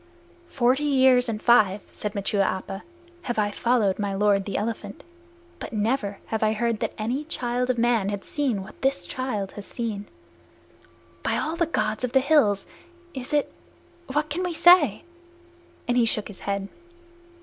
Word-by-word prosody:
"Forty 260 0 +2
years 260 -4 +4
and 215 -2 -2
five," 215 -4 +4
said 210 0 -5
Machua 200 0 0
Appa, 195 +1 -2 0.4
"have 240 -8 -4
I 205 -1 +1
followed 215 -4 +1
my 200 -1 -1
lord, 200 -1 +2
the 200 - -3
elephant, 210 -1 -4 0.6
but - - -7
never 210 -1 -1
have 220 - -3
I 215 0 +3
heard 230 0 -1
that - - -2
any 240 +7 -2
child 250 -4 -2
of 255 - +1
man 230 -4 +2
had 200 -1 -4
seen 260 -10 -1
what 190 - -14
this 265 -10 0
child 215 -4 -3
has 205 - -9
seen. 215 -4 -4 1.1
By - - 0
all 320 - -2
the 340 -1 +1
Gods 220 -8 -1
of 250 -1 -2
the 265 - +6
Hills, 265 -9 +3 0.5
it 255 -2 -7
is 295 -1 +2 0.7
what 300 +2 -1
can 340 +5 -1
we 360 -1 -2
say?" 330 - +5 0.8
and 245 - +1
he 245 -2 +4
shook 215 -2 -1
his 200 - -10
head. 200 -1 -3
230 Hz, 170 wpm, -25 LUFS, 205-260 Hz, 1.1 s, the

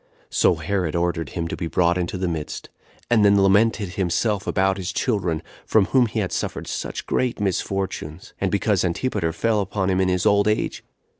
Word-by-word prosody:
So 90 - +3
Herod 85 0 -2
ordered 85 -3 -1
him 85 -1 -1
to - - -3
be 85 - -4
brought 85 +1 +2
into 90 0 -2
the 90 0 -1
midst, 80 -3 -5 0.4
and 115 -3 +3
then 100 0 +5
lamented 100 +1 +3
himself 95 +3 -1
about 95 0 +1
his 90 -1 -3
children, 90 -7 -1 0.2
from 110 -3 +3
whom 125 +1 +3
he 110 0 -2
had 95 -3 -2
suffered - - -3
such - - -4
great 125 -3 -1
misfortunes; 95 -4 -3
and 95 - +1
because 100 -1 +1
Antipater 90 -1 -1
fell 105 +6 +1
upon 95 -1 -1
him 95 0 +2
in 95 - +2
his 90 -1 0
old 100 0 +4
age. 105 - -1
95 Hz, 190 wpm, -23 LUFS, 85-105 Hz, 0.4 s, then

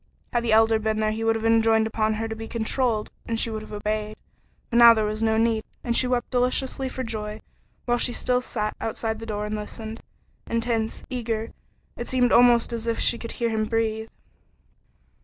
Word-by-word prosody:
Had 240 -1 +1
the 230 - 0
Elder 220 0 +5
been 220 0 -1
there 215 0 +1
he 220 +1 -3
would 225 0 +2
have 225 0 -3
enjoined 225 -1 +4
upon 220 0 0
her 225 +1 -2
to 225 - -5
be 225 0 -7
controlled 230 -1 -1 0.2
and 230 -1 -1
she 230 - +1
would 215 -1 -4
have 215 - -11
obeyed, 215 0 -3 0.6
but 235 - +2
now 235 -1 +9
there 215 -1 +1
was 215 +1 -3
no 220 0 +2
need, 225 -1 +2 0.2
and 235 -1 -1
she 255 - +4
wept 250 -1 -1
deliciously 260 +1 0
for 260 0 -4
joy 215 -2 -4 0.5
while 240 0 +1
she 245 - +2
still 250 +1 0
sat 215 -4 -3
outside 220 0 -2
the 225 - -8
door 210 -1 -3
and 210 - -4
listened. 220 +1 -7 0.5
Intense 230 -1 -2
eager 230 -3 -3 0.4
it 240 - -6
seemed 250 -1 +2
almost 240 -1 +5
as 230 0 -4
if 230 - 0
she 235 - +2
could 230 - -7
hear 235 -1 -1
him 220 -1 0
breathe. 220 0 -1
225 Hz, 205 wpm, -25 LUFS, 220-235 Hz, 0.6 s, now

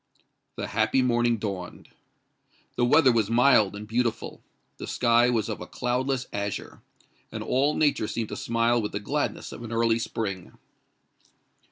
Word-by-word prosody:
The - - -5
happy 110 +4 +2
morning 120 -1 +2
dawned. 100 -4 -6 0.9
The 120 - +2
weather 130 +1 +5
was 110 -3 +1
mild 115 -4 +4
and 105 +1 -8
beautiful; 115 0 -2 0.4
the - - -7
sky 120 0 +3
was 115 -4 0
of 110 - -5
a - - -7
cloudless 125 +1 -1
azure; 100 0 -4 0.5
and - - -5
all 140 +4 +1
nature 145 -8 +1
seemed 115 -1 -3
to - - -5
smile 115 +1 +1
with 105 - -4
the - - -2
gladness 100 - -3
of - - -9
an 120 -1 -7
early 115 0 +2
spring. 100 -6 -4
115 Hz, 155 wpm, -26 LUFS, 110-125 Hz, 0.9 s, weather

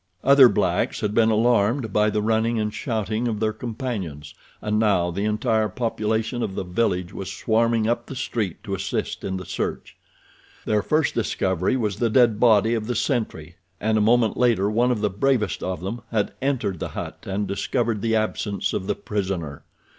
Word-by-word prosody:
Other 135 -2 +8
blacks - - 0
had 105 -1 -1
been 110 0 +4
alarmed 110 +1 +2
by 105 0 +3
the 105 0 -1
running 115 +1 +1
and 105 0 -2
shouting 110 -1 -2
of 110 -3 -2
their 110 0 0
companions 110 - -5 0.3
and 105 0 -1
now 95 -5 +2
the 100 +4 -2
entire 110 0 +1
population 110 0 -1
of 95 -4 -3
the - - -2
village 90 -1 -1
was 95 0 -5
swarming 115 +3 +1
up 120 0 -1
the 135 - -7
street 105 -8 -3
to 100 - -5
assist 95 0 -3
in 95 -1 -2
the 95 - -7
search. - - -4 0.7
Their 105 -1 +2
first 155 +7 +1
discovery 95 -1 0
was 105 -5 -1
the 115 +1 +1
dead 115 -2 +4
body 115 -2 +4
of 110 -2 -2
the 125 - -1
sentry, 105 - -2 0.2
and 110 +1 +1
a 110 - +3
moment 115 0 +3
later 110 -5 +2
one 120 +3 +2
of 120 -4 0
the 105 - +2
bravest 105 0 0
of 95 -3 -3
them 105 +6 -4
had 105 -3 -1
entered 125 - -1
the - - -4
hut - - -5
and 100 +1 -2
discovered 110 +2 -1
the 115 0 +1
absence 110 -1 -1
of 95 - -3
the - - 0
prisoner. 95 -8 -3
110 Hz, 185 wpm, -23 LUFS, 100-115 Hz, 0.7 s, Other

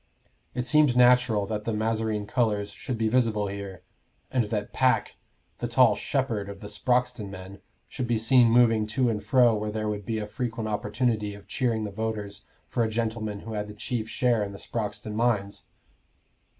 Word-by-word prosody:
It 125 -1 -1
seemed 150 -3 +4
natural 125 -4 +5
that 105 +1 -3
the 115 - -1
mazarine 110 -1 -1
colors 105 -4 0
should 125 +4 -5
be 110 0 +1
visible 110 -3 +2
here, 100 -2 -7 0.5
and 125 -3 +1
that 105 -1 -3
Pack, 130 0 +1 0.4
the - - -2
tall - - +5
"shepherd" 100 -3 -2
of 100 -1 -8
the 105 - -8
Sproxton 125 -4 0
men, 95 +1 -10 0.3
should 125 -3 -4
be 120 -1 +1
seen 120 +2 +5
moving 115 -2 +4
to 125 +3 +1
and 105 -2 -3
fro 120 +2 +4
where 105 0 -2
there 110 0 -3
would 105 -1 -3
be 115 - -1
a 105 - -3
frequent 115 0 -4
opportunity 105 0 -1
of 100 - -14
cheering 115 -4 0
the 105 - -4
voters 105 -1 -4 0.2
for 120 - -1
a 110 - 0
gentleman 110 -2 -2
who 115 - -7
had 105 -1 -3
the 105 - -10
chief 110 0 -3
share 120 -4 +1
in 100 -1 -5
the - - -8
Sproxton 105 0 -4
mines. 105 -3 0
110 Hz, 185 wpm, -27 LUFS, 105-120 Hz, 0.5 s, natural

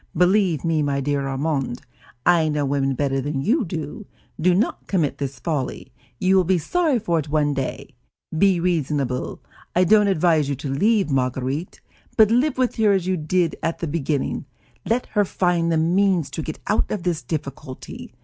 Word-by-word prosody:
Believe 180 -3 +3
me, 160 -2 +1
my 140 -1 0
dear 140 0 -1
Armand, 135 -2 -2 0.4
I 170 -3 +4
know 150 -1 0
women 135 -1 0
better 135 0 0
than 140 0 -2
you 255 - +2
do; 165 +2 -6 0.3
do 175 +2 +3
not 210 +6 -1
commit 170 -7 0
this 140 -2 -4
folly; 145 -2 -4 0.2
you 185 +8 +2
will 190 - +5
be 180 +1 +2
sorry 315 - +1
for 175 -7 0
it 150 -1 -5
one 145 -1 +1
day. 135 -1 -4 0.4
Be 190 +1 +3
reasonable. 145 -7 -1 0.3
I 180 - +5
don't 210 +3 +5
advise 160 -5 +2
you 140 - 0
to 135 +1 -4
leave 200 +3 +2
Marguerite, 130 +4 -2 0.4
but 220 -1 +6
live 260 +4 +2
with 255 -1 0
her 215 -2 +4
as 190 -3 0
you 185 0 +1
did 170 +1 0
at 165 - -1
the - - -3
beginning. 150 -2 -2 0.4
Let 240 +2 +1
her 210 -1 +4
find 175 -3 0
the 165 - +2
means 175 -2 +2
to 160 - -4
get 155 0 -5
out 210 - +1
of 205 -5 -3
this 170 -3 -1
difficulty. 140 -4 -7
165 Hz, 180 wpm, -22 LUFS, 140-190 Hz, 0.4 s, but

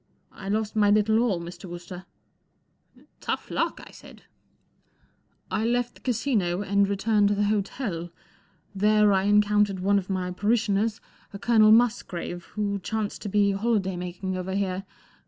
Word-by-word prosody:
I 195 - -8
lost 215 +1 -1
my 210 -1 +4
little 215 +1 +3
all, 225 -7 +1
Mr. 175 +4 -9
Wooster." 175 +1 -9 0.9
44 - - -22
Tough - - -4
luck," - - -1
I - - -14
said. - - -15 0.6
' - - -40
4 - - 0
I - - -1
left 245 +1 0
the - - -20
Casino, 215 -7 0
and 200 0 +2
returned 205 +1 +2
to 205 - +1
the 205 - +1
hotel. 200 -3 -2 0.6
There 210 +1 +4
I 190 0 +2
encountered 205 -1 +3
one 200 +2 +2
of 190 - -9
my 185 -1 -2
parishioners, 210 +2 0 0.3
a - - -5
Colonel 215 0 +4
Musgrave, 215 -7 +1
who 200 -1 -1
chanced 215 +2 -3
to 205 - -4
be 200 0 +3
holiday 195 -2 0
making 180 +1 -4
over 185 +1 -4
here. 195 -1 -2
205 Hz, 160 wpm, -26 LUFS, 190-215 Hz, 0.9 s, my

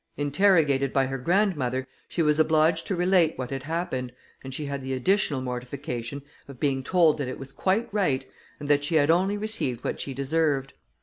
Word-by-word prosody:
Interrogated 145 -3 +3
by 135 -1 +2
her 135 0 -4
grandmother, 140 -6 0 0.2
she 170 - -1
was 150 0 +2
obliged 160 +1 +3
to 195 - -1
relate 175 -2 +3
what 130 0 -5
had 135 -1 -3
happened, 145 -5 -3 0.3
and 135 - -7
she 145 +3 -5
had 140 -1 -4
the 130 0 -4
additional 145 0 +1
mortification 125 +1 -5 0.2
of 135 -3 -11
being 135 -2 0
told 165 -2 +3
that 140 - -2
it 130 - -5
was 135 0 -8
quite 195 - 0
right, 140 -11 +1 0.3
and 145 - -6
that 145 0 +3
she 160 +3 -1
had 155 0 +4
only 190 +4 +2
received 205 - -2
what - - -3
she 135 - -5
deserved. 140 -1 0
145 Hz, 190 wpm, -26 LUFS, 135-170 Hz, 0.3 s, had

